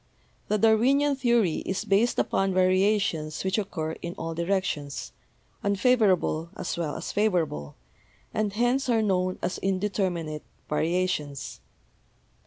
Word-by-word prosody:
The 215 - +1
Darwinian 255 +7 +4
theory 235 -10 +2
is 190 +3 -3
based 220 +4 +2
upon 195 -1 +1
variations 185 -4 +2
which 190 +2 +1
occur 165 -6 -3
in 170 +1 -5
all 165 -3 -4
directions, 170 -5 -2 0.5
unfavorable 200 -6 +2
as - - -3
well 160 -4 -3
as - - -5
favorable, 170 - 0 0.6
and 215 -1 0
hence 245 +4 +1
are 225 -2 +3
known 185 -2 0
as 180 - -2
indeterminate 185 -5 -1 0.3
variations. 155 -3 -1
190 Hz, 115 wpm, -27 LUFS, 170-215 Hz, 0.6 s, Darwinian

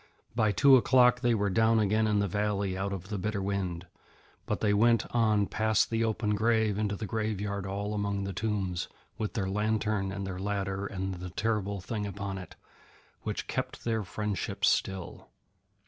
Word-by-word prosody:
By 110 -3 +3
two 135 +7 +7
o'clock 125 -1 +5
they 120 -2 +3
were 100 -2 0
down 110 +3 +4
again 110 +1 +2
in 105 -1 +2
the 100 0 +2
valley 100 -1 -1
out 100 +1 -2
of 95 0 -6
the 105 -3 -3
bitter 105 +2 -2
wind, 95 -3 -2 0.6
but - - -1
they 105 -1 +2
went 115 +2 +4
on 110 -3 +3
past 110 +2 +1
the 115 0 +1
open 110 -1 0
grave 110 -1 +2
into 105 -1 0
the 110 - -5
graveyard 100 -2 -2
all 100 +2 -3
among 100 -1 -1
the 100 0 -4
tombs, 95 -3 -2 0.3
with 110 - -2
their 100 -5 -1
lantern 105 0 0
and 100 0 -4
their 95 -1 -5
ladder 100 0 -2
and 95 -1 -3
the 90 0 -6
terrible 100 0 -1
thing 105 +2 -3
upon 100 -1 -4
it, 90 - -10 0.7
which - - -3
kept - - -4
their 110 -2 0
friendship 105 -1 -2
still. 95 -2 -1
105 Hz, 180 wpm, -29 LUFS, 95-110 Hz, 0.7 s, two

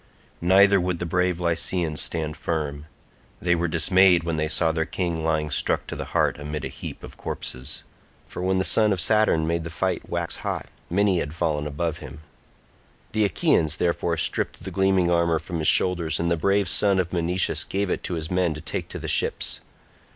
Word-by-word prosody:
Neither 95 +2 +5
would 90 0 -1
the 85 - -4
brave 90 +1 0
Lycians 85 -2 0
stand 80 -2 -3
firm; 75 -2 -3 0.5
they 90 0 +1
were 85 0 0
dismayed 90 +2 +4
when 85 -1 -2
they 75 0 0
saw 80 +1 +2
their 80 0 0
king 85 -3 -2
lying 80 -1 0
struck - - +1
to - - -6
the - - -5
heart - - +1
amid 75 0 -5
a - - -4
heap - - -8
of - - -11
corpses—for 65 +6 -7
when 95 +1 +1
the 95 - +1
son 110 +2 +4
of 95 - -3
Saturn 95 -3 +3
made 85 +1 -1
the 85 - -6
fight 90 +3 -2
wax 85 -1 -3
hot - - -4 0.2
many 95 0 +2
had 75 0 -4
fallen 75 -3 -1
above 80 +2 -3
him. 75 - -10 0.9
The 110 -1 +2
Achaeans, 80 -5 +1
therefore 85 -1 0
stripped - - -1
the 95 - -5
gleaming 95 -1 +2
armour 85 -1 +2
from 80 +1 -5
his 80 - 0
shoulders 85 -4 +3
and 85 +1 0
the - - +3
brave 100 +4 +1
son 100 +2 +3
of 90 -2 -1
Menoetius 90 +1 +1
gave 100 -1 -2
it - - -1
to 90 - -2
his 80 0 -5
men 90 -3 +1
to 75 - -8
take - - -5
to - - -6
the - - -6
ships. - - 0
85 Hz, 195 wpm, -24 LUFS, 80-90 Hz, 0.9 s, Neither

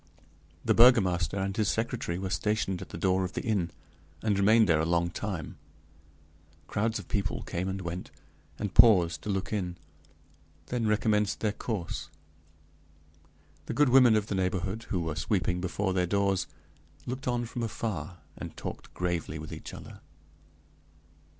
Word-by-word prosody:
The - - +4
burgomaster 100 -7 +5
and 95 0 -1
his 110 - +1
secretary 110 -6 -1
were 95 0 -4
stationed 95 -3 0
at 95 - -8
the - - -7
door 95 +2 +2
of 90 - -4
the - - -3
inn, 100 -7 +1 0.5
and 105 -2 +2
remained 110 +3 +5
there 80 -3 +4
a - - +2
long 85 +1 +1
time; 95 -6 -5 1.1
crowds 110 +2 -1
of - - -8
people 100 -1 -2
came 90 +1 -3
and 95 0 -3
went, 85 +1 -5 0.5
and 105 -3 -3
paused 85 -9 +6
to - - -6
look 95 +1 -2
in; 90 -4 -2 0.9
then 120 -3 0
recommenced 105 -1 +1
their 105 - +1
course. 105 -4 -4 1.6
The - - -3
good 145 -2 +4
women 125 -3 +7
of 105 -2 +1
the 105 - -4
neighborhood, 95 +3 -1
who 90 - 0
were 80 -2 -2
sweeping 90 -1 0
before 95 +1 -1
their 90 -1 +1
doors, 100 0 +1 0.6
looked 130 +2 -5
on 120 -1 0
from 120 +1 -5
afar, 95 -8 -4
and - - -8
talked - - -7
gravely 85 -3 -2
with 75 0 -7
each - - -8
other. - - -10
95 Hz, 155 wpm, -29 LUFS, 90-110 Hz, 1.6 s, women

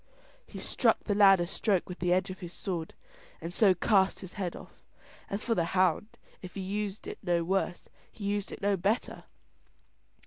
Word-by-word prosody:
He - - -10
struck - - +1
the 205 - 0
lad 195 -2 +7
a 175 - +1
stroke 195 +1 0
with 180 - -7
the 175 0 +1
edge 185 +1 +2
of 185 - -9
his 175 -1 -8
sword, 170 -4 -4 0.4
and 170 +1 -6
so 195 -1 +5
cast 195 -2 +2
his 185 -2 -9
head 185 -5 -3
off. - - -13 0.5
As 200 +2 -3
for 235 - +1
the 175 - +1
hound, 185 +2 +3 0.3
if 185 - -9
he 195 - -3
used 205 +1 -3
it - - -7
no 175 -3 +1
worse, 185 0 -1 0.2
he 215 - -11
used 205 0 -1
it - - -9
no 200 0 +3
better. 200 +6 -1
190 Hz, 195 wpm, -30 LUFS, 180-205 Hz, 0.5 s, lad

